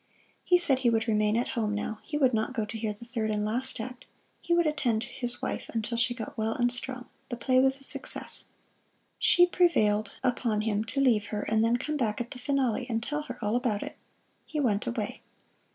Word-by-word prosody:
He 360 Hz, -, +5 dB
said 285 Hz, -7 st, +3 dB
he 245 Hz, -, +3 dB
would 225 Hz, 0 st, +1 dB
remain 215 Hz, 0 st, +2 dB
at 240 Hz, -, 0 dB
home 215 Hz, -3 st, -1 dB
now, 210 Hz, +1 st, -3 dB
he 295 Hz, -, -4 dB
would 260 Hz, -4 st, +3 dB
not 220 Hz, +4 st, 0 dB
go 220 Hz, -3 st, 0 dB
to 210 Hz, -, -6 dB
hear 220 Hz, -1 st, -2 dB
the 210 Hz, +3 st, -10 dB
third 230 Hz, -2 st, -2 dB
and 210 Hz, -1 st, 0 dB
last 250 Hz, +4 st, -1 dB
act. 250 Hz, +2 st, -7 dB, 0.4 s
He 345 Hz, -, -6 dB
would 340 Hz, 0 st, +4 dB
attend 250 Hz, -7 st, +1 dB
his 245 Hz, 0 st, -3 dB
wife -, -, -3 dB
until 225 Hz, +1 st, -1 dB
she 240 Hz, +1 st, +2 dB
got 230 Hz, -, -6 dB
well 220 Hz, 0 st, 0 dB
and 245 Hz, 0 st, +2 dB
strong. 250 Hz, 0 st, -3 dB, 0.2 s
The 240 Hz, -, -4 dB
play 255 Hz, +2 st, +3 dB
was 265 Hz, +1 st, +3 dB
a -, -, -13 dB
success! -, -, -2 dB, 0.7 s
She 355 Hz, -, +6 dB
prevailed 215 Hz, -, +2 dB
upon 235 Hz, -4 st, +1 dB
him 215 Hz, -1 st, 0 dB
to 240 Hz, +5 st, -2 dB
leave 230 Hz, -7 st, +3 dB
her 210 Hz, 0 st, -3 dB
and 220 Hz, 0 st, +2 dB
then 230 Hz, +1 st, +3 dB
come 305 Hz, +4 st, -2 dB
back 220 Hz, -6 st, 0 dB
at 240 Hz, 0 st, -4 dB
the 250 Hz, -, -7 dB
finale 255 Hz, -2 st, 0 dB
and 225 Hz, -1 st, -1 dB
tell 295 Hz, +3 st, -2 dB
her 250 Hz, -4 st, -7 dB
all 210 Hz, +2 st, +1 dB
about 240 Hz, -5 st, 0 dB
it. -, -, -7 dB, 0.5 s
He 305 Hz, -, -3 dB
went 220 Hz, -7 st, +1 dB
away. 225 Hz, -4 st, -3 dB
240 Hz, 220 wpm, -29 LUFS, 220-260 Hz, 0.7 s, She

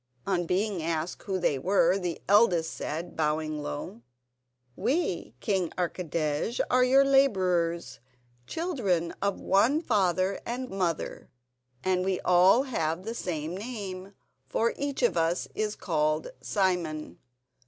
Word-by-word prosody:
On 175 Hz, -3 st, 0 dB
being 195 Hz, 0 st, 0 dB
asked 165 Hz, +1 st, -2 dB
who 195 Hz, -2 st, -2 dB
they 145 Hz, -6 st, +1 dB
were, 180 Hz, +2 st, +3 dB
the 175 Hz, -3 st, -3 dB
eldest 185 Hz, -6 st, +4 dB
said, 160 Hz, +4 st, -5 dB
bowing 155 Hz, -1 st, -1 dB
low: 145 Hz, -5 st, -6 dB, 0.7 s
"We, 255 Hz, -, -1 dB
King 185 Hz, -, 0 dB
Archidej, 170 Hz, -, -1 dB
are 250 Hz, 0 st, +5 dB
your 270 Hz, +2 st, +5 dB
labourers, 185 Hz, -11 st, +2 dB, 0.5 s
children 215 Hz, -, -1 dB
of 200 Hz, -1 st, 0 dB
one 235 Hz, +10 st, +3 dB
father 195 Hz, -, +1 dB
and 250 Hz, +2 st, -4 dB
mother, 180 Hz, -5 st, -2 dB, 0.5 s
and 185 Hz, -1 st, +1 dB
we 190 Hz, -1 st, 0 dB
all 185 Hz, +8 st, +5 dB
have 165 Hz, -, -2 dB
the 225 Hz, +3 st, -4 dB
same 165 Hz, -6 st, -3 dB
name, 200 Hz, -3 st, -6 dB, 0.3 s
for 230 Hz, +1 st, +1 dB
each 280 Hz, -2 st, -3 dB
of 240 Hz, -, +3 dB
us 165 Hz, +2 st, +1 dB
is 215 Hz, -1 st, -2 dB
called 155 Hz, -2 st, 0 dB
Simon. 170 Hz, -, -1 dB
185 Hz, 125 wpm, -28 LUFS, 165-215 Hz, 0.7 s, are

